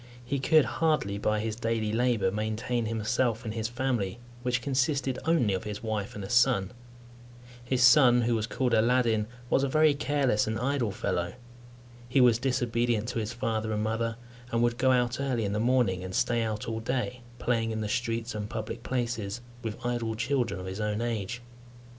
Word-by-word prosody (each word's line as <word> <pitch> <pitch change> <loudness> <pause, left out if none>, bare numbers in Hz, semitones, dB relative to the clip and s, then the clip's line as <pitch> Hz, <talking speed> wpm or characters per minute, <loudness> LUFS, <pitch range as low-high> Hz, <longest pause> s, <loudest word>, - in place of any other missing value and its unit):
He 140 +2 -1
could 155 +1 +4
hardly, 115 -7 0
by 105 0 +1
his 110 -1 -2
daily 115 -2 -1
labour, 115 -5 +2
maintain 110 +3 -2
himself 115 +1 0
and 110 - -3
his 110 -1 -2
family, 120 -4 -1 0.2
which 125 -1 -1
consisted 135 -1 0
only 155 -11 +3
of 95 - -2
his 105 0 -6
wife 110 -2 -3
and 105 - -6
a 95 - -6
son. 120 -6 +3 0.9
His 125 +1 +1
son, 130 -2 +7
who 120 +1 +1
was 110 -1 0
called 125 0 -1
Aladdin, 115 -2 +3 0.2
was 135 - +2
a 140 - +1
very 155 +1 +4
careless 140 -6 +1
and 110 0 -1
idle 130 -2 0
fellow. 90 -2 -2 0.8
He 135 - +3
was 120 -3 +5
disobedient 120 -3 0
to 120 - -2
his 110 0 -3
father 110 -2 -2
and 105 0 -1
mother, 115 +1 -1 0.4
and 115 0 +2
would 120 0 +1
go 130 0 +4
out 125 -1 +1
early 125 -5 0
in 100 - -2
the 105 - 0
morning 115 -6 +2
and 95 0 -5
stay 120 -1 +2
out 110 -2 -3
all 115 -1 -2
day, 125 +1 -2 0.2
playing 115 -2 0
in 110 -1 -2
the 105 - -2
streets 115 +1 -2
and 105 -1 -4
public 110 -2 -5
places 120 -4 -2 0.2
with 110 -2 -4
idle 120 -2 -1
children 120 -2 -1
of 90 - -7
his 95 +3 -5
own 105 +1 -1
age. 120 0 -3
115 Hz, 190 wpm, -28 LUFS, 110-125 Hz, 0.9 s, son